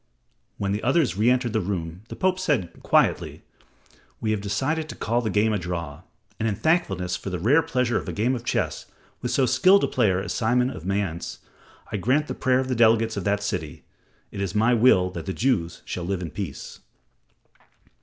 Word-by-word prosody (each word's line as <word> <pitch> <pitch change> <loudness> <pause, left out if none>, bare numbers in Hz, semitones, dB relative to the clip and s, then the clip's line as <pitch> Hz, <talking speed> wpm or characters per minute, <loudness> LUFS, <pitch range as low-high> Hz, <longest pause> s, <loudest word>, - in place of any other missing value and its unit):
When 100 -1 -1
the 105 +2 -1
others 135 - +2
re 110 +4 +3
entered 125 -2 +1
the 110 - +1
room, 90 -2 -4
the - - -6
Pope 185 0 +1
said 140 - -1
quietly, - - +1 0.8
"We 110 - -1
have 105 -2 -1
decided 140 +11 -1
to - - -6
call 120 +2 0
the 110 - -2
game 105 +2 +2
a 105 - 0
draw, 85 -3 -5 0.4
and 115 0 +1
in 105 - -1
thankfulness 95 - 0
for 95 - -6
the 90 - -3
rare 125 - +4
pleasure 125 -7 0
of - - -7
a - - -2
game 115 +5 0
of 120 -2 -4
chess - - -2 0.3
with 125 - -2
so 130 +2 +2
skilled 190 +9 +5
a - - +3
player 100 -7 +2
as - - -4
Simon 125 +2 +1
of 90 - -8
Mayence, 95 -4 -2 0.5
I 105 - -1
grant 130 +10 +1
the - - -4
prayer 130 -1 +1
of 130 - -2
the 130 - 0
delegates 115 -1 +3
of 100 - -4
that 100 0 0
city. - - -4 0.5
It 100 - -5
is 95 -1 -3
my 110 +3 +3
will 110 -6 +4
that 95 - -7
the 95 - -2
Jews 100 -10 -1
shall 90 - -4
live 90 +1 -2
in 80 - -6
peace." 95 -9 -6
110 Hz, 205 wpm, -24 LUFS, 95-125 Hz, 0.8 s, skilled